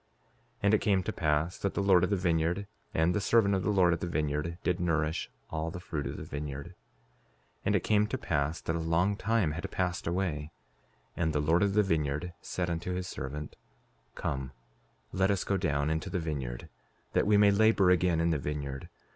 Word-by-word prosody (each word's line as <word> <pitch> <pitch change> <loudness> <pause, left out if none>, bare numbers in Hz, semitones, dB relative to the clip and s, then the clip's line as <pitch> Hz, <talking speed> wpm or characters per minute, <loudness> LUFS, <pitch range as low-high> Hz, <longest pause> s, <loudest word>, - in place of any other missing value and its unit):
5:28 - - -38
And 100 +1 +4
it 110 - +4
came 95 -3 +2
to - - -3
pass 80 +2 0
that 100 - -2
the 100 - 0
Lord 95 -3 +5
of 90 - +2
the 100 - +2
vineyard 85 +1 0 0.3
and 80 +2 +2
the 105 - 0
servant 100 -1 +3
of 95 - +1
the 90 - -1
Lord 90 -4 +4
of 85 - -2
the - - -3
vineyard 75 +1 -1
did 90 -1 0
nourish 80 -2 0 0.2
all 80 +1 -2
the 90 +1 -6
fruit 80 -5 -4
of - - -5
the - - -6
vineyard. 70 +2 -5
5:29 - - -15 0.9
And - - +2
it - - +1
came 105 -1 +3
to 130 - -2
pass 75 - -1
that 80 - -2
a - - -1
long 85 +5 +1
time 105 -6 +1
had 80 +3 -4
passed 90 -2 -2
away, 85 -4 -1 0.7
and 80 -2 0
the 75 - +1
Lord 80 +4 +3
of 100 -1 +2
the 105 - +5
vineyard 80 -1 -1
said 90 -2 -3
unto 85 +2 -2
his 90 0 -3
servant: 75 -1 -6 0.6
Come, 65 0 -3 0.6
let 95 +1 +2
us 100 -3 +1
go 100 - 0
down 75 -5 0
into 80 0 -2
the 95 - -2
vineyard, 70 -8 -4 0.5
that - - +2
we 105 -1 +5
may 100 0 +6
labor 100 -2 +4
again 90 -2 +3
in 85 0 +2
the 80 - +1
vineyard. 70 -2 -4
85 Hz, 215 wpm, -30 LUFS, 75-95 Hz, 0.9 s, may